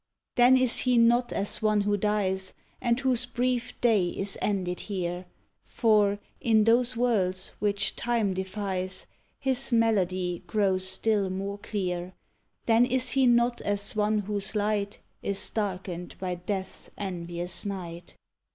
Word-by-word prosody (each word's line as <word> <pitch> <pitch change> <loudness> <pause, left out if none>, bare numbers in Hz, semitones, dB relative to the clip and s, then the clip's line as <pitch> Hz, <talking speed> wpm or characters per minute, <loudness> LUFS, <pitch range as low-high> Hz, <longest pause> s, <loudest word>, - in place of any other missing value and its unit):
Then 250 +2 +6
is 255 -2 +3
he 250 -1 +3
not 240 +1 +4
as 200 - -1
one 215 -1 +2
who 205 0 +1
dies 190 -2 0 0.3
And 235 +1 +1
whose 255 -2 +1
brief 250 0 -1
day 215 -7 +3
is 195 +2 0
ended 185 -3 -1
here; 180 -3 -4 0.4
For, 210 -3 +2 0.2
in 220 -2 +3
those 240 +2 +3
worlds 190 -6 0
which 205 -1 0
Time 230 -5 0
defies, 190 -1 -3 0.3
His 265 0 0
melody 185 -6 +1
grows 190 -1 +1
still 200 0 +1
more 195 +2 -4
clear; 180 -4 -4 0.5
Then 230 +1 +5
is 255 0 0
he 265 -1 +3
not 240 0 +3
as 205 +1 -1
one 210 0 +2
whose 205 0 -2
light 205 -1 -1 0.2
Is 200 -1 -1
darkened 185 -4 -4
by 185 -1 -3
Death's 190 +2 -5
envious 175 -2 -4
night! 175 -4 -6
205 Hz, 135 wpm, -27 LUFS, 185-230 Hz, 0.5 s, Then